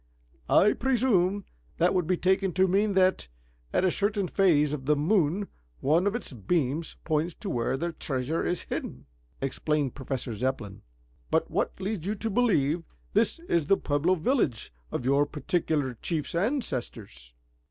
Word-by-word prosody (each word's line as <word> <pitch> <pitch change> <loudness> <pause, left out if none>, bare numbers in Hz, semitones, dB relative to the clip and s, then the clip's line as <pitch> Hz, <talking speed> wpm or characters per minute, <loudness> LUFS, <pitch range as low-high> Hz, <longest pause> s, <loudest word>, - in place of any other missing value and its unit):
"I 210 - +5
presume 205 -7 +1 0.3
that 175 +2 +3
would 180 -4 +1
be 185 0 +2
taken 190 0 +1
to 185 +2 +3
mean 200 +3 +2
that, 185 - +2 0.4
at - - +1
a 185 - +3
certain 205 0 0
phase 155 -7 +3
of 135 -3 -5
the 150 - +4
moon, 175 +4 +1 0.3
one 165 +7 +2
of 205 - 0
its 240 - -4
beams 140 - -1
points 160 +1 0
to 200 - -5
where 120 +2 0
the 170 +4 -2
treasure 135 +1 -2
is 175 - -1
hidden," 65 +2 -5 0.4
explained 145 0 -1
Professor 130 -3 -4
Zepplin. 110 -3 -3 0.5
"But - - +1
what - - -1
leads 195 -2 -3
you 210 - 0
to 225 +2 -3
believe 175 - +2 0.3
this 220 +9 +2
is 165 -4 +1
the 195 - +4
Pueblo 150 +6 +1
village 160 - 0 0.2
of 125 - -3
your 140 +2 +3
particular 150 -2 -1
chief's 160 -4 -2
ancestors?" 120 - -3
165 Hz, 155 wpm, -28 LUFS, 140-195 Hz, 0.5 s, I